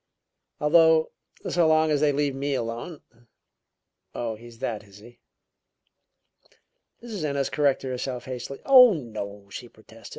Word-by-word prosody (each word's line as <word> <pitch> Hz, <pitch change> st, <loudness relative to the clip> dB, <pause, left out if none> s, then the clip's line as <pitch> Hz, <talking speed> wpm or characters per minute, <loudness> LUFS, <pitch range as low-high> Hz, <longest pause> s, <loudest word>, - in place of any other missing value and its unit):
Although, 160 Hz, +1 st, +4 dB, 0.4 s
so 175 Hz, -2 st, +2 dB
long 155 Hz, 0 st, +3 dB
as 150 Hz, -1 st, +1 dB
they 150 Hz, -1 st, +3 dB
leave 145 Hz, 0 st, -1 dB
me 140 Hz, +1 st, -2 dB
alone 120 Hz, +7 st, -5 dB, 0.6 s
" -, -, -46 dB
"Oh, 115 Hz, -2 st, -3 dB
he's 115 Hz, +1 st, -13 dB
that, 115 Hz, -4 st, -4 dB
is 100 Hz, -1 st, -17 dB
he?" 120 Hz, +3 st, -16 dB, 1.8 s
Mrs. 215 Hz, -8 st, -6 dB
Ennis 140 Hz, -2 st, -1 dB
corrected 140 Hz, -3 st, 0 dB
herself 125 Hz, -1 st, -5 dB
hastily. 130 Hz, +1 st, -7 dB
"Oh, 250 Hz, -4 st, +8 dB
no," 105 Hz, -7 st, -7 dB
she 120 Hz, +3 st, -8 dB
protested. 110 Hz, +1 st, -15 dB
135 Hz, 135 wpm, -25 LUFS, 115-155 Hz, 1.8 s, Oh